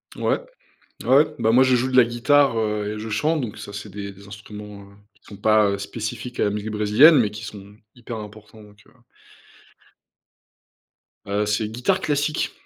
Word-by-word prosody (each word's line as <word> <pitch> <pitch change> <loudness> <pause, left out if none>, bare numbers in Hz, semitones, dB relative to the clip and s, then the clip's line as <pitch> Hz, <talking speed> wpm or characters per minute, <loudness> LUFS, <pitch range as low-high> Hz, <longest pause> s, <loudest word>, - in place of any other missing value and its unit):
Ouais, - - 0 0.6
ouais. 140 +4 +5
Bah, 110 - +2
moi, 125 +3 +6
je 130 -1 +3
joue 130 +2 0
de 130 - +2
la 125 - +9
guitare, 120 +2 +2
heu 105 -1 -2
et 105 - -7
je 110 - -6
chante, 150 +9 0
donc, 115 -5 -6
ça, 100 -1 -9
c'est 105 +1 -7
des 100 0 -7
des 100 +1 -16
instruments, 105 0 -10
heu, - - -19 0.2
qui - - -33
sont 100 - -12
pas, 110 0 +3
heu, 100 - -2
spécifiques 110 +4 -6
à - - +3
la 105 - +1
musique 105 +1 -4
brésilienne, 105 +10 +6
mais 110 -4 +2
qui 105 +1 -9
sont 100 -1 -10 0.2
hyper 120 -1 -8
importants, 105 0 -12
donc, 105 0 -18
heu - - -23 2.4
heu, 100 +1 0
c'est 105 +1 -1
guitare 120 +3 0
classique, 150 +1 -1
110 Hz, 190 wpm, -22 LUFS, 105-125 Hz, 2.4 s, la